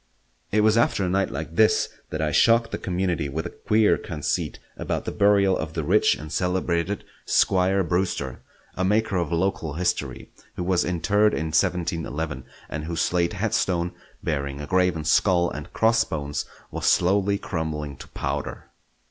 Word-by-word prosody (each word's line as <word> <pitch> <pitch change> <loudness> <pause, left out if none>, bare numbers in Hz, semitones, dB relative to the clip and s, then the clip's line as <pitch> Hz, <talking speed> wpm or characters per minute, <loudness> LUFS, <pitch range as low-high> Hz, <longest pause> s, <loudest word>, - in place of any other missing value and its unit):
It 105 - +3
was 110 +1 +4
after 100 -4 +2
a - - -1
night 95 +1 +1
like 80 +3 -6
this 110 +3 +4 0.2
that 80 0 -2
I 75 - 0
shocked 115 +7 +4
the - - -3
community 90 -5 -1
with 80 +4 -3
a - - -5
queer 110 0 +2
conceit 75 -5 -3 0.2
about - - -3
the - - -2
burial 100 -2 +4
of 80 0 -4
the 80 - -2
rich - - +3
and 75 0 -9
celebrated 90 +1 -1 0.2
Squire 95 +1 +3
Brewster, 85 -7 -1 0.4
a 95 - -1
maker 105 +1 +1
of 85 -1 -1
local 85 -3 -1
history 90 +4 -2 0.2
who - - -3
was 90 -1 +2
interred 100 +5 +2
in 80 0 -2
1711, 80 -5 -1 0.2
and 75 0 -5
whose 85 0 -3
slate 85 +1 +1
headstone, 95 -5 0 0.3
bearing 70 -2 -2
a 75 - -5
graven 90 -2 +1
skull 85 +1 +3
and 75 0 -7
crossbones, 80 -11 +1 0.3
was - - -2
slowly 100 +2 +3
crumbling 80 -6 -4
to - - -11
powder. - - -4
90 Hz, 160 wpm, -24 LUFS, 80-100 Hz, 0.4 s, was